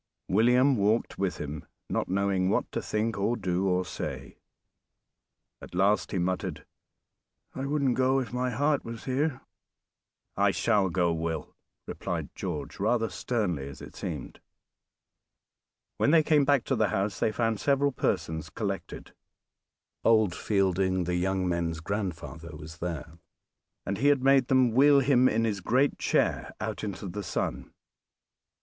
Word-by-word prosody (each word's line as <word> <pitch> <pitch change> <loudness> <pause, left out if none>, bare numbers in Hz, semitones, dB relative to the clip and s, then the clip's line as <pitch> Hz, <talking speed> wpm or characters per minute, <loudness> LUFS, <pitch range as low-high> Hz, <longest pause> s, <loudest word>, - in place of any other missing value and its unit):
William 125 +6 +4
walked 105 +3 +1
with 95 -4 -1
him, 75 0 -5 0.2
not - - -2
knowing 95 -1 +1
what - - 0
to - - -2
think 110 -1 -1
or 115 +5 +1
do 95 -1 0
or 90 0 +1
say; - - -6 1.2
at - - -10
last 100 +3 +2
he - - -1
muttered, 90 +1 -2 0.9
"I 135 +1 -4
wouldn't 140 -3 +1
go, 130 +1 +2
if 125 -2 -5
my 125 0 0
heart 145 +2 +1
was 115 -1 -7
here!" 135 +1 -1 0.9
"I - - +3
shall 100 -3 +2
go, 85 -1 +1
Will," 80 -1 -4 0.3
replied - - -4
George, - - -5
rather 115 +2 +1
sternly 90 - -2
as 65 - -11
it - - -11
seemed. - - -6 1.6
When - - +3
they 160 0 +6
came 150 -2 +3
back 140 -3 +3
to 135 - 0
the 110 -3 +2
house 95 +2 -1
they 110 - +2
found 115 -1 0
several 140 0 +2
persons 80 - -2
collected. 100 +2 -5 0.9
Old 110 -5 +4
Fielding, 95 -2 +1
the 90 +1 -2
young 95 +1 0
men's 85 -2 -1
grandfather, 85 -3 -5
was 80 +1 -10
there; 85 -1 -5 0.8
he 140 - +1
had 140 -3 +4
made 135 -2 +5
them 130 -2 +4
wheel 140 +4 +6
him 130 -1 +4
in 115 +2 +1
his 105 -4 -1
great 130 +9 +2
chair - - 0
out 110 0 -4
into 100 -1 -4
the 95 +3 -5
sun. 100 - -3
105 Hz, 145 wpm, -28 LUFS, 90-125 Hz, 1.6 s, they